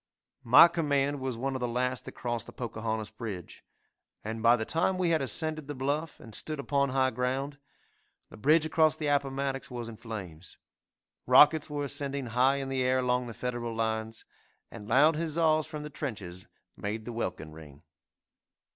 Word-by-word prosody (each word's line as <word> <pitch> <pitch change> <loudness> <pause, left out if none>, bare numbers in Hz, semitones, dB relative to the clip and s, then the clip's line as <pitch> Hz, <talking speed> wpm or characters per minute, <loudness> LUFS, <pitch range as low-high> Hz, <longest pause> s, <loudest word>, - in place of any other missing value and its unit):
'" - - -50
My - - +12
command 145 -4 0
was 130 -3 -3
one 135 +2 -2
of - - -2
the 125 - -1
last 125 +1 -1
that - - -8
crossed 120 -2 -4
the - - -9
Pocahontas 110 -2 -4
bridge, 110 -6 -7 0.6
and 110 +1 -4
by 115 +1 +6
the 110 -2 -3
time 170 +6 +1
we 180 -2 +1
had 160 -2 +2
ascended 155 +4 -3
the 145 - -5
bluff, 145 +4 -2
and 115 - -12
stood 155 +7 -3
upon 140 0 +1
high 130 0 +2
ground, 130 +4 -2 0.7
the - - -11
bridge 155 +7 +4
across 155 -1 +3
the 155 - -5
Appomattox 140 -1 -1
was 120 -2 -5
in 115 -2 -9
flames 95 -8 -8 0.7
rockets 150 +1 +6
were 145 -1 -3
ascending 140 -1 -1
high 130 +3 +4
in 135 -1 -3
the 130 -1 0
air 130 +1 +2
along 125 -1 0
the 115 - -8
Federal 120 -2 -4
lines, 110 0 -2 0.5
and 105 - -10
loud 150 +6 +5
huzzas 155 -1 +1
from 150 -1 -6
the 150 - -7
trenches 100 - -6 0.3
made 110 +2 -4
the 120 - -6
welkin 90 -8 -4
ring. 75 -3 -13
130 Hz, 180 wpm, -29 LUFS, 115-145 Hz, 0.7 s, My